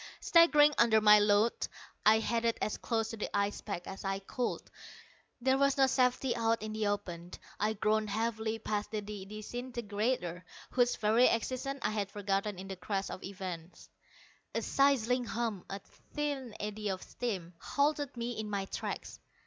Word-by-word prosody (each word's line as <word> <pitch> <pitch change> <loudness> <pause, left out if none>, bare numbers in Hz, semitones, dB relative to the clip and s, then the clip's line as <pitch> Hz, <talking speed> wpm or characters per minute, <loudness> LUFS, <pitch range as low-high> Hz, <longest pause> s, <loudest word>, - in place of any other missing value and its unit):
Staggering 300 -3 +6
under 230 -2 +6
my 210 0 +8
load, 205 +2 +3 0.4
I 220 +1 +8
headed 230 +1 0
as 215 - -1
close 225 -2 -1
to 225 - -6
the 210 - -3
ice 200 0 0
pack 180 -4 -5
as 195 - -7
I 195 0 -1
could. 220 +5 -3 0.8
There 265 +2 +2
was 280 0 +3
no 270 - +6
safety 255 -1 +2
out 230 -2 +1
in 215 0 -4
the 215 -1 0
open. 180 -4 -3 0.3
I 215 +1 +1
groaned 215 0 +1
heavily 220 +1 -1
past 210 -1 -2
the 215 -1 -2
disintegrator, 210 -1 -3 0.3
whose 245 -1 +3
very 220 +4 +4
existence 260 +4 -1
I 210 - +1
had 205 -2 -2
forgotten 200 0 -1
in 190 +1 -7
the 190 -1 -6
crash 195 +1 -2
of - - -7
events. 185 -3 -7 0.7
A - - 0
sizzling 250 -3 +3
hum, 225 -4 -2
a 195 - -3 0.4
thin 280 -6 -2
eddy 210 0 -3
of 190 -1 -3
steam, 190 -8 -4
halted 285 -2 0
me 235 -1 -3
in 215 -1 -3
my 200 -2 -1
tracks. - - -5
215 Hz, 165 wpm, -32 LUFS, 200-245 Hz, 0.8 s, my